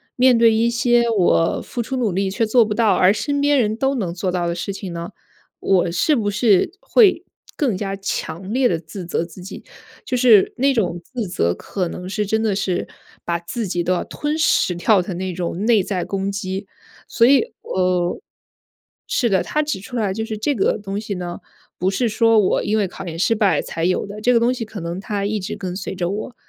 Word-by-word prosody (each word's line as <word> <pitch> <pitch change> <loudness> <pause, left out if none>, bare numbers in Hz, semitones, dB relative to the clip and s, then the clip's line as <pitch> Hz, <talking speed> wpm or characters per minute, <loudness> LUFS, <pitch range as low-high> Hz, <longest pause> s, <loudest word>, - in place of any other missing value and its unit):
面 255 -1 +5
对 230 -1 +5
一 225 +2 +2
些 235 0 +2
我 180 -6 +2
付 240 - -5
出 260 +3 -4
努 225 -7 0
力 195 +1 0
却 225 +4 0
做 235 +2 +4
不 215 -1 -2
到， 220 -1 +3
而 185 - +5
身 285 +7 -1
边 285 -1 +3
人 215 -3 +1
都 270 +4 0
能 190 -9 -2
做 180 +1 -2
到 175 -1 -1
的 170 - -2
事 175 +3 -4
情 195 -2 -6
呢， 170 0 -5 0.5
我 180 -3 +2
是 240 - +2
不 215 -5 0
是 210 - +3
会 450 -6 +4 0.3
更 260 -9 +1
加 195 0 -3
强 190 -1 -4
烈 255 0 +3
地 170 - 0
自 170 +3 -9
责 170 - -1
自 175 +2 -12
己？ 185 - -9 0.4
就 255 - -2
是 240 -5 +5
那 275 +2 +3
种 180 -9 -1
自 235 +2 -5
责 85 - 0
可 185 -3 -3
能 180 +2 -7
是 205 +2 -2
真 220 +2 0
的 210 -3 +1
是 185 -2 -1 0.4
把 170 0 -1
自 205 +6 -4
己 175 -1 -1
都 180 - -1
要 180 - 0
吞 300 +1 -3
噬 185 - +2
掉 190 +3 +3
的 180 0 -5
那 185 +1 -3
种 180 +3 -3
内 225 -3 +4
在 185 -2 -3
攻 195 0 -2
击。 195 0 -4 0.4
所 230 - +3
以， 275 +3 +6 0.2
呃 180 -1 0 0.9
是 245 - +1
的， 190 -3 +2
他 305 - -1
指 300 -9 -3
出 245 - -9
来 210 -5 0
就 220 +3 -3
是 220 -1 -5
这 285 +7 0
个 195 - +1
东 205 -1 -5
西 210 -2 -4
呢， 175 -1 -5 0.4
不 185 - +1
是 235 +5 0
说 225 0 +3
我 200 - +2
因 215 - 0
为 205 -3 +1
考 195 +2 -9
研 165 -1 -5
失 190 +6 +2
败 210 -2 +2
才 165 - -5
有 180 +1 +1
的， 205 +1 -8
这 245 - +3
个 235 - +4
东 235 +2 +2
西 250 -2 -4
可 215 -1 -8
能 170 +2 -4
它 200 0 -3
一 210 +1 -1
直 185 - -5
跟 180 -2 -5
随 190 - -5
着 175 -2 -2
我， 215 +5 -5
200 Hz, 245 characters per minute, -20 LUFS, 180-230 Hz, 0.9 s, 以